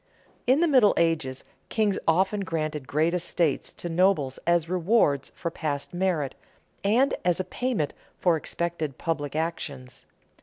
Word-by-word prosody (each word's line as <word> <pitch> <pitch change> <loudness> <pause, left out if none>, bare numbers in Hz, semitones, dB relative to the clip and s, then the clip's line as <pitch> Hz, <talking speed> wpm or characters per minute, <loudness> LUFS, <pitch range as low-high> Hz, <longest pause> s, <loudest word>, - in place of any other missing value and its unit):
_ - - -42 0.4
In 265 +5 +4
the 345 - +4
Middle 255 -9 +5
Ages 160 -6 0 0.3
kings 210 -3 +1
often 190 +5 +3
granted 155 -6 -3
great 160 +4 +1
estates 170 -4 0
to - - -6
nobles 165 -6 +2
as 170 -1 +3
rewards 175 - +2
for 170 - -3
past 145 -2 -3
merit 175 -6 0 0.5
and 235 +7 +3
as 180 -1 +2
a - - +1
payment 210 - -2 0.2
for 175 -2 +3
expected 160 -3 -3
public 145 -4 -2
actions. 145 -5 -4
170 Hz, 145 wpm, -26 LUFS, 150-190 Hz, 0.5 s, Middle